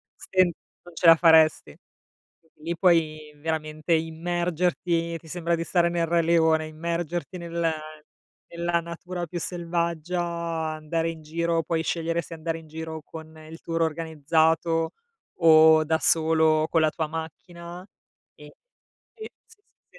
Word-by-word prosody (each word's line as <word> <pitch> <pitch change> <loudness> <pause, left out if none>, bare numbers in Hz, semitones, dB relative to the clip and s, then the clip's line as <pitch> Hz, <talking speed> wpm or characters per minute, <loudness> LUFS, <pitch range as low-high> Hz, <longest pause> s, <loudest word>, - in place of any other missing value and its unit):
sen 185 -2 +2 0.3
non 175 -1 -15
ce 175 - -3
la 165 0 +10
faresti. 160 -2 +4 0.6
Quindi 160 -1 -30
lì 170 - -2
puoi 155 -4 +1
veramente 155 +1 -2
immergerti, 170 +1 -1
ti 160 - -17
sembra 170 0 -1
di 165 - -3
stare 170 0 +2
nel 170 -1 0
Re 170 +1 +2
leone, 160 -1 +2
immergerti 170 +2 -4
nella 170 -1 -1 0.8
nella 170 0 0
natura 175 +1 -6
più 175 +2 -6
selvaggia, 170 0 -2
andare 165 -1 -3
in 160 -1 -8
giro, 165 +1 -1
puoi 160 +1 -1
scegliere 165 0 -1
se 165 - -11
andare 165 0 -4
in 160 - -16
giro 160 0 -7
con 160 +1 -11
il 165 - -11
tour 165 0 -3
organizzato 160 +1 +1 0.5
o 160 -1 +7
da 160 0 +1
solo 160 -1 +3
con 165 - +2
la 155 - +3
tua 160 -2 -3
macchina 170 +2 -8 0.5
e - - -14 0.7
eh, 440 -1 -9 0.2
sì, 450 -2 -22 0.3
sì, - - -18
165 Hz, 140 wpm, -25 LUFS, 160-170 Hz, 0.8 s, la